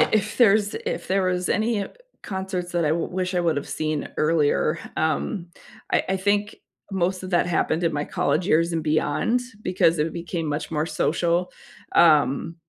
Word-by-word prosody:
i -, -, +4 dB
if 215 Hz, 0 st, +1 dB
there's 215 Hz, -3 st, +4 dB
if -, -, -3 dB
there 195 Hz, +1 st, +2 dB
was 180 Hz, 0 st, 0 dB
any 220 Hz, +1 st, +1 dB
e -, -, -4 dB, 0.4 s
concerts 190 Hz, -2 st, -4 dB
that 175 Hz, -2 st, +1 dB
I -, -, +2 dB
w 165 Hz, +2 st, 0 dB
wish 185 Hz, 0 st, -2 dB
I 180 Hz, -, +2 dB
would 165 Hz, -3 st, +1 dB
have 145 Hz, -, -4 dB
seen 155 Hz, -2 st, -2 dB
earlier, 155 Hz, 0 st, +2 dB, 0.2 s
um, 170 Hz, +3 st, -1 dB, 0.4 s
I -, -, +3 dB
I 190 Hz, -, +2 dB
think 205 Hz, +2 st, 0 dB, 0.4 s
most 185 Hz, 0 st, 0 dB
of 185 Hz, -, -6 dB
that 175 Hz, -1 st, +2 dB
happened 170 Hz, 0 st, 0 dB
in 165 Hz, -, +1 dB
my 145 Hz, 0 st, -1 dB
college 175 Hz, +3 st, 0 dB
years 165 Hz, -1 st, +2 dB
and 165 Hz, -1 st, -1 dB
beyond 155 Hz, +10 st, +1 dB, 0.2 s
because 170 Hz, -3 st, +2 dB
it 155 Hz, +2 st, 0 dB
became 170 Hz, -1 st, -4 dB
much 150 Hz, +2 st, -3 dB
more 155 Hz, 0 st, -1 dB
social, 170 Hz, +2 st, 0 dB, 0.5 s
um, 155 Hz, -1 st, +4 dB
175 Hz, 185 wpm, -24 LUFS, 160-190 Hz, 0.5 s, i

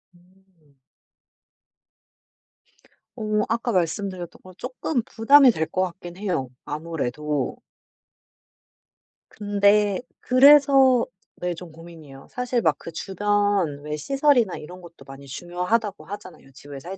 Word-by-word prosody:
음. 175 Hz, -5 st, -29 dB, 2.4 s
어 215 Hz, -3 st, -1 dB
아까 235 Hz, +1 st, -1 dB
말씀드렸던 180 Hz, 0 st, -2 dB
거 185 Hz, -, -13 dB
쪼끔 255 Hz, -, -3 dB
부담이 260 Hz, +4 st, +5 dB
될 160 Hz, -6 st, -2 dB
것 185 Hz, -, -1 dB
같긴 175 Hz, -1 st, -7 dB
해요 175 Hz, -11 st, -2 dB, 0.2 s
아무래도. 150 Hz, -2 st, -3 dB, 1.7 s
근데 205 Hz, 0 st, +2 dB, 0.2 s
그래서 270 Hz, -1 st, +6 dB, 0.3 s
네 180 Hz, 0 st, -2 dB
좀 170 Hz, -1 st, -10 dB
고민이에요. 160 Hz, -4 st, -13 dB
사실 250 Hz, -1 st, -2 dB
막 160 Hz, -5 st, +2 dB
그 170 Hz, -, -9 dB
주변 200 Hz, -3 st, 0 dB
왜 150 Hz, 0 st, -4 dB
시설이나 270 Hz, -, +2 dB
이런 180 Hz, +4 st, -11 dB
것도 170 Hz, -1 st, -15 dB
많이 135 Hz, 0 st, -12 dB
중요하다고 180 Hz, -, -2 dB
하잖아요 185 Hz, -8 st, -10 dB
집을 140 Hz, +1 st, -11 dB
살 185 Hz, +6 st, -8 dB
185 Hz, 235 characters per minute, -23 LUFS, 160-220 Hz, 2.4 s, 그래서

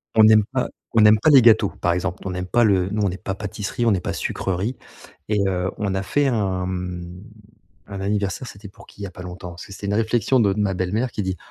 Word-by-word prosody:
On 110 Hz, -, +7 dB
n'aime 110 Hz, 0 st, +7 dB
pas 130 Hz, -1 st, 0 dB, 0.3 s
on 115 Hz, -, +6 dB
n'aime 105 Hz, 0 st, +6 dB
pas 155 Hz, -, +3 dB
les 135 Hz, -5 st, +7 dB
gâteaux, 110 Hz, -3 st, +5 dB
par 85 Hz, -, -1 dB
exemple. 90 Hz, +1 st, -3 dB
On 95 Hz, -, -3 dB
n'aime 90 Hz, 0 st, -4 dB
pas 120 Hz, +5 st, +3 dB
le 95 Hz, -4 st, +2 dB
nous 105 Hz, +1 st, -1 dB
on 100 Hz, -, +2 dB
n'est 90 Hz, -, -5 dB
pas 95 Hz, -1 st, -4 dB
pâtisserie, 105 Hz, +3 st, -4 dB
on 115 Hz, -, +4 dB
n'est 95 Hz, -, +2 dB
pas -, -, -3 dB
sucrerie, 95 Hz, +7 st, -2 dB, 0.5 s
et 105 Hz, -, 0 dB
heu, 90 Hz, -1 st, -1 dB
on 100 Hz, -2 st, -2 dB
a 95 Hz, -, -1 dB
fait 145 Hz, +9 st, 0 dB
un, 95 Hz, -7 st, 0 dB
mmh, 90 Hz, 0 st, -5 dB, 0.6 s
un 100 Hz, -1 st, -7 dB
anniversaire, 100 Hz, +4 st, -2 dB
c'était 100 Hz, -2 st, -11 dB
pour -, -, -17 dB
qui -, -, -15 dB
il -, -, -4 dB
y -, -, -3 dB
a -, -, -11 dB
pas 90 Hz, -, -11 dB
longtemps? 90 Hz, 0 st, -8 dB
Parce 85 Hz, +1 st, -10 dB
que -, -, -14 dB
c'était 100 Hz, -, -8 dB
une 100 Hz, -, 0 dB
réflexion 115 Hz, +3 st, +2 dB
de 105 Hz, -4 st, +3 dB
de 105 Hz, -, -4 dB
ma 100 Hz, -2 st, +1 dB
belle-mère 100 Hz, +7 st, -1 dB
qui 105 Hz, -, -3 dB
dit: 95 Hz, -1 st, -3 dB
100 Hz, 265 wpm, -22 LUFS, 95-110 Hz, 0.6 s, On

